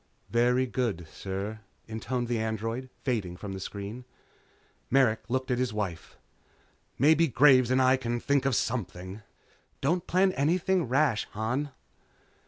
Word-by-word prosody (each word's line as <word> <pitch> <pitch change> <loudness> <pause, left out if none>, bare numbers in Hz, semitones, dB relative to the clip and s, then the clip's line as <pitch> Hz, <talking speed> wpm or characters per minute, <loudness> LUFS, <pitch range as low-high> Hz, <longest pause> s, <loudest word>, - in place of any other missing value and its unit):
"Very 125 +2 +3
good, 115 -10 -2
sir," 100 +3 -5 0.3
intoned 115 +3 -3
the 120 -1 -1
android, 115 +3 -3
fading 105 -9 -2
from 100 +1 -6
the 95 - -5
screen. 100 +5 -6 0.9
Merrick 125 -4 +3
looked 130 +1 -1
at 125 - +1
his 125 -3 0
wife. 95 -6 -4 0.8
"Maybe 160 +5 +5
Graves 130 -2 +5
and 130 +1 +3
I 130 0 +5
can 120 -2 -2
think 140 +1 +1
of 135 -3 +2
something." 95 -4 -3 0.6
"Don't 170 +5 0
plan 185 +2 +3
anything 175 +2 +1
rash, 130 -3 +2
Han." 125 +7 -1
120 Hz, 135 wpm, -28 LUFS, 110-135 Hz, 0.9 s, Maybe